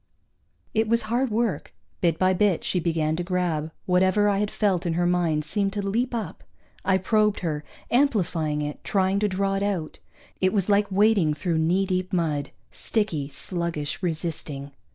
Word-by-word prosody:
It 220 Hz, 0 st, +2 dB
was 230 Hz, +1 st, +2 dB
hard 240 Hz, +4 st, 0 dB
work. 225 Hz, -1 st, -1 dB, 0.3 s
Bit 170 Hz, -3 st, +2 dB
by 185 Hz, 0 st, +3 dB
bit 195 Hz, -2 st, +2 dB
she 180 Hz, -, 0 dB
began 160 Hz, -2 st, 0 dB
to 175 Hz, -, -1 dB
grab; 175 Hz, -4 st, -1 dB, 0.2 s
whatever 185 Hz, +3 st, +3 dB
I 200 Hz, -1 st, +1 dB
had 210 Hz, 0 st, 0 dB
felt 190 Hz, -5 st, 0 dB
in 165 Hz, -, 0 dB
her 175 Hz, +1 st, +1 dB
mind 170 Hz, -4 st, +1 dB
seemed 200 Hz, +4 st, -1 dB
to 200 Hz, -1 st, -2 dB
leap 240 Hz, +5 st, 0 dB
up. 210 Hz, -8 st, -5 dB, 0.4 s
I 190 Hz, -1 st, +3 dB
probed 210 Hz, +2 st, +2 dB
her, 155 Hz, -4 st, -2 dB, 0.3 s
amplifying 175 Hz, -, +1 dB
it, 150 Hz, 0 st, -5 dB
trying 195 Hz, 0 st, +1 dB
to 210 Hz, -, +2 dB
draw 195 Hz, 0 st, 0 dB
it 195 Hz, -, -1 dB
out. 195 Hz, -6 st, -2 dB, 0.4 s
It 185 Hz, 0 st, +2 dB
was 200 Hz, -2 st, +1 dB
like 205 Hz, 0 st, +3 dB
wading 195 Hz, -6 st, +3 dB
through 165 Hz, +2 st, -1 dB
knee 175 Hz, +5 st, +2 dB
deep 185 Hz, 0 st, -2 dB
mud 150 Hz, -5 st, 0 dB, 0.2 s
sticky, 165 Hz, -11 st, -1 dB
sluggish, 170 Hz, 0 st, -3 dB
resisting. 155 Hz, -5 st, -3 dB
185 Hz, 175 wpm, -25 LUFS, 165-205 Hz, 0.4 s, by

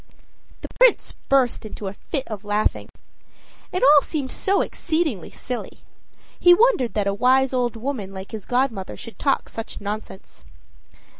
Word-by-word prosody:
The -, -, -6 dB
Prince -, -, +5 dB, 0.2 s
burst 265 Hz, -3 st, +2 dB
into 215 Hz, -1 st, -8 dB
a 190 Hz, -, -4 dB
fit 270 Hz, +6 st, -5 dB
of 210 Hz, -2 st, -6 dB
laughing. 210 Hz, +1 st, -1 dB, 0.8 s
It 365 Hz, -, -1 dB
all 290 Hz, +2 st, +8 dB
seemed 280 Hz, -4 st, -4 dB
so 395 Hz, +1 st, +1 dB
exceedingly 315 Hz, -, -2 dB
silly; 250 Hz, -1 st, -7 dB, 0.6 s
he 355 Hz, 0 st, +7 dB
wondered 430 Hz, -, +2 dB
that 205 Hz, -2 st, +1 dB
a 200 Hz, -, +1 dB
wise 260 Hz, +5 st, +3 dB
old 245 Hz, -2 st, 0 dB
woman 225 Hz, -4 st, -4 dB
like 190 Hz, 0 st, -9 dB
his 220 Hz, -3 st, -7 dB
godmother 245 Hz, -6 st, -1 dB
should 230 Hz, -, -11 dB
talk 275 Hz, -, +1 dB
such 225 Hz, -, -7 dB
nonsense. 205 Hz, -1 st, -7 dB
250 Hz, 150 wpm, -23 LUFS, 210-280 Hz, 0.8 s, all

